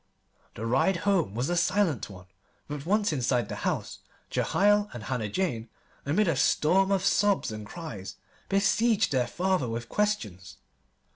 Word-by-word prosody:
The 110 - -5
ride 135 +11 +2
home 180 - +1
was 125 +4 -1
a 175 - 0
silent 170 - +1
one; 90 -2 -12 0.4
but 145 +1 -6
once 205 -2 +2
inside 125 -4 0
the - - -5
house, - - -3 0.3
Jehiel 205 +1 +2
and 120 - -7
Hannah 115 -3 -3
Jane, 120 - -2 0.4
amid 185 +8 +2
a 165 - +2
storm 185 +8 +3
of 195 -1 +1
sobs 200 - +2
and 105 -1 -7
cries, 115 - -8 0.3
besieged 210 +1 +2
their 125 -3 +1
father 180 -2 0
with 115 +1 -5
questions. 105 - -2
155 Hz, 150 wpm, -28 LUFS, -, 0.4 s, storm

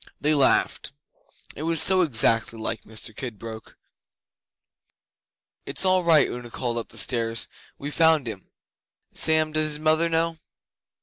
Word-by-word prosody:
They 150 +2 +1
laughed: 140 0 +1 0.6
it - - -8
was 165 0 -1
so 190 +3 +6
exactly 115 -6 +3
like 110 0 -5
Mr 110 0 -6
Kidbrooke. 115 -2 -9 1.9
'It's - - 0
all 185 -1 +3
right,' 160 -4 +4
Una 120 -1 -8
called 120 0 -3
up 115 - -7
the - - -11
stairs. 115 -2 -1 0.3
'We 145 +1 -7
found 160 -4 +2
him, 105 -4 -8 0.6
Sam. 155 -1 +2
Does 155 0 0
his 150 -1 -2
mother 160 +2 +1
know? 165 0 -1
145 Hz, 135 wpm, -24 LUFS, 115-160 Hz, 1.9 s, so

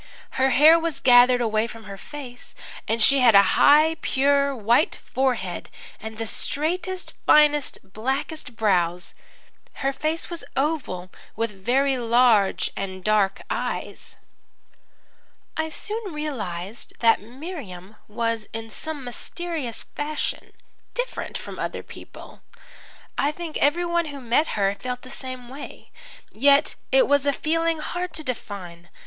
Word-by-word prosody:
Her 265 0 +2
hair 310 +5 +7
was 330 -2 -3
gathered 245 0 +6
away 220 -1 +1
from 225 -1 -11
her 200 -1 -8
face, 250 +2 -9 0.3
and 225 0 +1
she 275 +3 +6
had 240 -4 +6
a 200 - +9
high, 310 +3 +6
pure, 280 +1 +2
white 235 +6 +2
forehead, 245 -9 -2 0.3
and 220 0 -8
the 225 - -3
straightest, 355 - -2
finest, 295 -1 +5 0.2
blackest 265 +3 -3
brows. 180 -5 +1 0.7
Her 275 - +2
face 310 +4 -2
was 340 -1 -6
oval, 265 - -1 0.2
with 230 0 -1
very 255 +7 +1
large 230 -5 +3
and 190 -1 -5
dark 205 -2 +2
eyes. - - -4 1.4
"I 315 0 -1
soon 420 +5 -4
realized 215 - -5
that 230 -3 +5
Miriam 225 - -9
was 230 0 -2
in 225 0 -6
some 310 +1 -5
mysterious 280 +1 -4
fashion 295 +1 -4 0.4
different - - -3
from - - -9
other - - -3
people. - - -12 0.8
I 285 - +2
think 325 0 -7
everyone 340 +3 +2
who 285 -2 -7
met 250 +4 +1
her 195 -1 +2
felt 250 +4 -5
the 255 - -10
same 255 -2 -6
way. 270 +4 -10 0.4
Yet 280 +5 +4 0.2
it - - +5
was 285 0 +3
a - - +5
feeling 330 +3 0
hard 355 +3 -4
to 310 - -5
define. 185 - -7
260 Hz, 130 wpm, -24 LUFS, 220-305 Hz, 1.4 s, a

